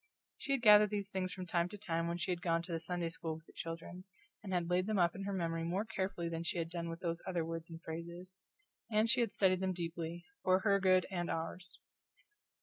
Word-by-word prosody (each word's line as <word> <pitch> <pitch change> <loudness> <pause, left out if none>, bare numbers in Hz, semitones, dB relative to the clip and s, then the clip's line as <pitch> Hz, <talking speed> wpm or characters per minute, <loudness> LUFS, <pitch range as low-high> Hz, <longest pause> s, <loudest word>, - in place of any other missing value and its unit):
She 275 - 0
had 265 -3 0
gathered 210 -1 +9
these 205 -1 -2
things 185 -1 -1
from 185 - -5
time 170 0 +1
to 210 - -8
time 165 -5 -1
when 170 0 -1
she 175 +2 -1
had 175 -1 -2
gone 165 -1 +1
to 175 - -8
the 165 - -1
Sunday 175 0 -2
school 165 -1 -4
with 160 +1 -13
the - - -18
children, 165 +2 -6 0.4
and 200 -2 -6
had 175 -2 +1
laid 180 +2 +2
them 215 -1 +1
up 175 -2 +4
in 195 +1 -5
her 200 - -1
memory 165 -3 -1
more 185 +6 0
carefully 190 -5 -2
than 165 0 -3
she 170 +3 -1
had 165 -1 -2
done 170 -1 -3
with 165 +2 -6
those 170 -1 -1
other 175 -3 0
words 165 0 -5
and 165 0 -9
phrases; 170 +3 -6 0.5
and 220 +1 +3
she 260 - +5
had 230 - +1
studied 185 -2 +3
them 190 0 0
deeply, 170 0 -4 0.2
for 185 0 +4
her 200 -1 +4
good 185 -1 +5
and 175 -2 -1
ours. 165 +2 -4
175 Hz, 240 wpm, -35 LUFS, 165-190 Hz, 0.5 s, gathered